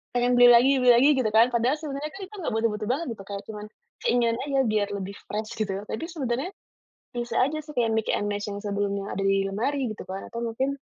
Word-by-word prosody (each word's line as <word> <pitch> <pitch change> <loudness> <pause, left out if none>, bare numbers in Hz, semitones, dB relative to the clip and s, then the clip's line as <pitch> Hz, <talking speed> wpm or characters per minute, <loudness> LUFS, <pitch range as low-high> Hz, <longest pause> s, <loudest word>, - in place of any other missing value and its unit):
pengen 245 0 +2
beli 245 - +9
lagi 260 +3 +6
beli 250 - +7
lagi 270 +5 +6
gitu 245 - +1
kan 230 - +7
padahal 240 +4 +2
sebenarnya 295 -1 -4
kan 390 - -9
itu 420 - -13
nggak 315 - -2
butuh-butuh 220 -1 0
banget 300 +6 -1 0.2
kayak 200 0 -5
cuman 210 -1 -7 0.4
keinginan 235 -1 +2
aja 275 -1 0
biar 210 -1 +1
lebih 200 0 -5
fresh 215 +2 -4
gitu 200 -3 -1 0.2
tapi 220 - -3
sebenarnya, 275 -2 -2 0.6
bisa 240 -1 -4
aja 300 +4 -1
supaya 245 -7 0
mix 220 0 0
and 205 - -2
match 205 0 -3
yang 200 0 -4
sebelumnya 200 -1 -2
ada 195 - -2
di 195 0 +3
lemari 245 +6 -1
gitu 215 - -7
kan 190 +1 -5
atau 235 - -5
mungkin, 245 +4 -1
230 Hz, 215 wpm, -26 LUFS, 205-265 Hz, 0.6 s, beli